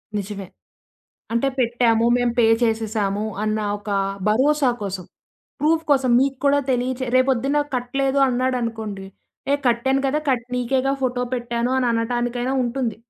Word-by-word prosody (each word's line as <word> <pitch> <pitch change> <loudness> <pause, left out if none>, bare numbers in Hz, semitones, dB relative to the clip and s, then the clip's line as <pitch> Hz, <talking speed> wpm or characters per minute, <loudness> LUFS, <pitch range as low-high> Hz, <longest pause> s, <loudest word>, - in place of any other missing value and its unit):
నిజమే. 200 -1 -4 0.9
అంటే 235 +4 +1
పెట్టాము. 235 -2 +2
మేము 245 -1 +1
పే 235 - +5 0.2
చేసేసాము 215 -3 0 0.2
అన్న 215 0 0 0.2
ఒక 205 0 -8 0.4
భరోసా 270 +5 +3
కోసం 190 -2 -4 0.6
ప్రూఫ్ 315 +2 +2
కోసం. 265 -3 +3
మీకు 270 0 0
కూడా 285 0 +4
తెలియచే 255 +1 -1
రేపు 255 +1 +4
పొద్దున్న 270 +3 +1 0.2
కట్టలేదు 270 +2 0
అన్నాడనుకోండి, 230 -6 -2 0.5
ఏ - - +5
కట్టాను 250 +3 +2
కదా! 290 +3 +1
కట్ 245 -3 0
నీకే 250 +2 0
గదా 275 - +2
ఫోటో 250 -1 0
పెట్టాను 240 0 -2
అననటానికైనా 240 +1 0
ఉంటుంది. 240 -2 -2
245 Hz, 135 wpm, -22 LUFS, 230-260 Hz, 0.9 s, పే